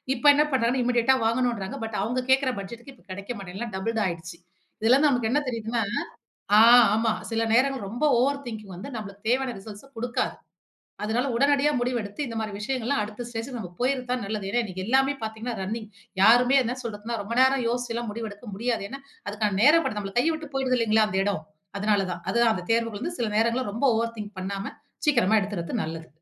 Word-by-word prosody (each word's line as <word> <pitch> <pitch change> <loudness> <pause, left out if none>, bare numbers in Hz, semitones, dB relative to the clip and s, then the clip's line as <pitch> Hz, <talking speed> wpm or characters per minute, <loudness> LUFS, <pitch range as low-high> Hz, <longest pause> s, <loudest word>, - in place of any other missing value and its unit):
இப்ப 245 - -8
என்ன 295 +1 +4
பண்ணுறாங்க 245 -2 +2
னா 255 - +1
இமிடியேட்டா 245 +1 +3
வாங்கணும்ங்கிறாங்க. 235 0 0
பட் 225 -1 -4
அவங்க 245 +5 -1
கேட்கிற 265 0 +4
பட்ஜெட்க்கு 235 +7 -8
இப்போ 175 - -25
கிடைக்க 200 +4 -8
மாட்டேங்குது. 190 -1 -8
எல்லாம் 235 -4 -5
டபிள்டு 225 +3 -1
ஆயடுச்சு. 170 0 -6 0.4
இதில 240 +4 +5
நமக்கு 245 -5 +1
என்ன 295 - +3
தெரியுதுனா 230 0 -2 0.8
ஆ - - +8 0.4
ஆமா. 225 0 +2 0.2
சில 225 -1 0
நேரங்கள் 260 -2 +2
ரொம்ப 240 +8 -3 0.2
ஓவர் 280 +2 +1
திங்கிங் 215 -4 -7
வந்து 200 +9 -8
நம்பளுக்கு 200 -1 -8
தேவையான 255 0 +1
ரிசல்ட்ஸ 205 +5 -11
குடுக்காது. 245 +1 -1 0.7
அதனால 235 +5 0
உடனடியா 285 +2 +3
முடிவெடுத்து 240 -2 -2
இந்த 230 -1 -6
மாரி 215 -2 -3
விஷயங்கள்லாம் 240 +1 -1
அடுத்த 210 +3 -6
ஸ்டேஜ்க்கு 240 +2 -5
நம்ம 180 -5 -6
போய்றது 255 0 +1
தான் 250 -3 0
நல்லது. 200 -1 -4
ஏன்னா 240 +2 +2
இன்னைக்கு 185 -2 -5
எல்லாமே 270 +3 +3
பார்த்தீங்கன்னா 220 +2 -4
ரன்னிங் 215 +2 -4 0.3
யாருமே 245 +5 +6
என்ன 245 +2 -2
சொல்றதுன்னா 225 +1 -4
ரொம்ப 225 +4 -5
நேரம் 260 -1 +4
யோசிச்சுலாம் 240 -2 -2
முடிவெடுக்க 220 0 -7
முடியாது. 225 -1 -1
ஏன்னா 275 +1 -7 0.3
அதுக்கான 205 -1 -1
நேர 300 +5 +7
படம் 210 - -2
நம்மள 195 -1 -5
கையை 320 +6 +3
விட்டு 315 -2 -7
போயிடுது 260 -1 +1
இல்லங்களா 220 -1 +3
அந்த 190 -2 -1
இடம். 195 -5 -1 0.4
அதனால 205 -1 +2
தான் 170 0 -7
அதுதான் 235 -1 +3
அந்த 180 - -5
தேர்வுகள் 230 -2 0
வந்து 340 +2 -3
சில 230 - +1
நேரங்கள்ல 230 0 +1
ரொம்ப 230 +6 -2
ஓவர் 230 0 -1
திங்க் 210 -1 -7
பண்ணாம 195 +2 -4 0.3
சீக்கிரமா 220 -7 +4
எடுத்துறது 190 -5 -3
நல்லது. 160 0 -6
230 Hz, 190 wpm, -26 LUFS, 205-250 Hz, 0.8 s, ஆ